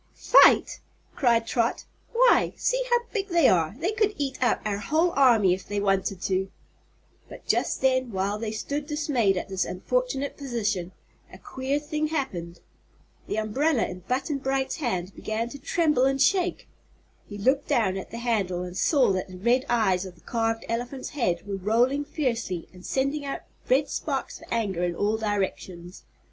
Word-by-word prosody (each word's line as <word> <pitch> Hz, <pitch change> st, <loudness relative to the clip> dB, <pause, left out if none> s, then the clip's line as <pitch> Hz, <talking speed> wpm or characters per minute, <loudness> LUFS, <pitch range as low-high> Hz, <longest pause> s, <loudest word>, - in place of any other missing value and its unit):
"Fight!" -, -, +5 dB, 0.4 s
cried 235 Hz, -4 st, +3 dB
Trot; 235 Hz, 0 st, 0 dB, 0.3 s
"why, -, -, +4 dB
see -, -, +1 dB
how 485 Hz, 0 st, +3 dB
big 400 Hz, -3 st, -1 dB
they 340 Hz, -7 st, +4 dB
are. 165 Hz, +1 st, +2 dB
They 350 Hz, +8 st, -1 dB
could 425 Hz, -2 st, +1 dB
eat 275 Hz, -3 st, -3 dB
up 250 Hz, -, +2 dB
our 205 Hz, -1 st, -1 dB
whole 320 Hz, -, +1 dB
army, 235 Hz, -, +5 dB
if 185 Hz, -, -6 dB
they 205 Hz, 0 st, -2 dB
wanted 195 Hz, -2 st, 0 dB
to." 190 Hz, 0 st, 0 dB, 0.8 s
But -, -, -12 dB
just -, -, 0 dB
then, 260 Hz, -2 st, +2 dB
while 200 Hz, +2 st, -1 dB
they 220 Hz, -1 st, -3 dB
stood 285 Hz, +7 st, -4 dB
dismayed 280 Hz, -10 st, +1 dB
at -, -, -3 dB
this 190 Hz, -2 st, -1 dB
unfortunate 285 Hz, -, -2 dB
position, 215 Hz, -, -2 dB, 0.4 s
a -, -, -11 dB
queer 265 Hz, +2 st, -3 dB
thing 300 Hz, +1 st, -2 dB
happened. 180 Hz, -, -4 dB, 0.7 s
The -, -, -2 dB
umbrella 240 Hz, +6 st, +1 dB
in 180 Hz, -, -7 dB
Button 265 Hz, -, -2 dB
Bright's 270 Hz, +2 st, -1 dB
hand 195 Hz, -, -3 dB
began 225 Hz, +2 st, -3 dB
to 280 Hz, -, -9 dB
tremble 300 Hz, -2 st, +2 dB
and 270 Hz, 0 st, +1 dB
shake. 360 Hz, +5 st, +1 dB, 0.6 s
He 205 Hz, -, -7 dB
looked 260 Hz, +7 st, +1 dB
down 195 Hz, -5 st, +2 dB
at 190 Hz, -, -6 dB
the 230 Hz, -, -7 dB
handle 200 Hz, -7 st, -1 dB
and 180 Hz, 0 st, -7 dB
saw 265 Hz, -, +3 dB
that 185 Hz, -1 st, -2 dB
the 185 Hz, -1 st, -10 dB
red 245 Hz, +7 st, +1 dB
eyes 200 Hz, -6 st, +2 dB
of 180 Hz, -, -12 dB
the 170 Hz, -, -22 dB
carved 225 Hz, -1 st, -1 dB
elephant's 245 Hz, +3 st, -4 dB
head 180 Hz, -12 st, -1 dB
were 200 Hz, -1 st, -4 dB
rolling 240 Hz, +9 st, +1 dB
fiercely 235 Hz, -, -2 dB
and 180 Hz, 0 st, -14 dB
sending 275 Hz, +5 st, -1 dB
out 275 Hz, -1 st, -4 dB, 0.3 s
red 275 Hz, +3 st, +3 dB
sparks 275 Hz, -4 st, -3 dB
of -, -, -14 dB
anger 200 Hz, -6 st, -1 dB
in 175 Hz, -1 st, -1 dB
all 210 Hz, +4 st, 0 dB
directions. 190 Hz, -4 st, -4 dB
235 Hz, 175 wpm, -26 LUFS, 195-280 Hz, 0.8 s, Fight